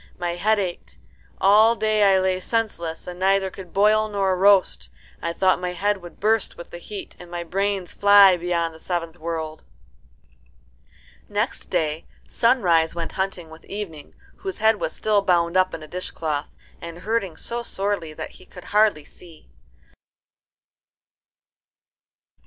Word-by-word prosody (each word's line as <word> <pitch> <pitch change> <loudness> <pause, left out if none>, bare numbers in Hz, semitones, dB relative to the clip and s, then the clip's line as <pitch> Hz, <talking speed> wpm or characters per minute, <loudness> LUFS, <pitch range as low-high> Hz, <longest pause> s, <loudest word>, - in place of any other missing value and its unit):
My 175 -1 -2
head 215 +5 +1
ached. 185 -4 -5 0.4
All 215 +4 +5
day 215 -1 +1
I 195 -2 +5
lay 185 0 0
senseless, 185 -7 -2
and 180 0 -8
could - - -13
neither 195 0 +2
boil 210 +4 +2
nor 195 -2 +1
roast. 195 0 +3 0.3
I 170 - -2
thought 185 +2 +2
my 180 0 -3
head 205 +3 0
would 175 -3 -13
burst 220 +1 +1
with 170 - -10
the 175 - -8
heat, 200 +3 -8
and 175 - -12
my 175 0 -4
brains 195 +1 -2
fly 200 -2 +7
beyond 170 -1 -1
the 160 - -14
seventh 170 -1 -4
world." 160 -1 -5 1.7
Next - - -2
day 155 0 -1 0.2
Sunrise 180 -10 +2
went 170 -1 -4
hunting 190 -4 -3
with 160 +1 -13
Evening, 180 -8 -7 0.2
whose 385 -2 -5
head 220 0 +3
was - - -2
still 210 -2 +1
bound 175 -2 +1
up 185 0 +3
in 155 - -7
a - - -10
dishcloth, 155 -4 -4 0.3
and 170 0 -8
hurting 205 -7 -1
so 235 0 -3
sorely 200 -7 -3
that 155 - -7
he - - -17
could 180 - -12
hardly 210 -8 +3
see. 165 - -17
185 Hz, 150 wpm, -23 LUFS, 170-205 Hz, 1.7 s, fly